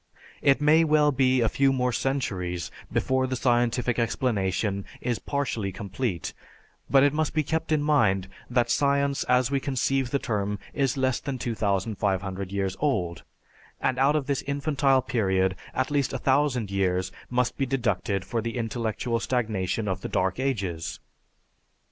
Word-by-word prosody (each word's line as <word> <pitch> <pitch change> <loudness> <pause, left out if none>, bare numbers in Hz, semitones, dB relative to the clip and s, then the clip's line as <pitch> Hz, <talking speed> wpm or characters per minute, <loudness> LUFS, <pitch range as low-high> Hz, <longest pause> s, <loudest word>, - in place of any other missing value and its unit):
It 140 0 +4
may 150 +2 +5
well 150 -1 +4
be 130 -2 +3
a 115 - +3
few 135 +4 +3
more 125 -1 +1
centuries 95 -11 -2 0.2
before 130 0 +1
the 130 - -2
scientific 120 0 +1
explanation 100 -5 0 0.2
is 120 -2 -2
partially 125 -8 -2
complete, 100 - -3 0.6
but 135 -1 +6
it 145 0 +4
must 155 0 -1
be 155 - +2
kept 160 +3 -2
in 150 -2 +2
mind 110 -11 +2 0.2
that 120 -1 +2
science 140 0 +2
as 125 +1 +2
we 140 - +2
conceive 135 -1 0
the 140 - +1
term 105 -5 -2 0.2
is 135 -2 0
less 130 -1 +1
than 140 -2 -4
2500 100 -4 -1
years 95 -1 -1
old, 90 - 0 0.6
and 130 -1 0
out 140 +3 +4
of 150 -3 0
this 140 -1 -1
infantile 140 -2 +2
period, 95 -7 +1 0.2
at 130 +2 -1
least 140 -2 +1
1000 130 -5 +1
years 95 -2 0 0.2
must 125 0 0
be 135 - -1
deducted 105 -6 -1
for 115 +4 -2
the 115 +2 -4
intellectual 115 0 -2
stagnation 110 -4 -1
of 95 - -2
the - - -5
dark 95 +5 0
ages. 95 -11 -2
125 Hz, 155 wpm, -26 LUFS, 100-135 Hz, 0.6 s, but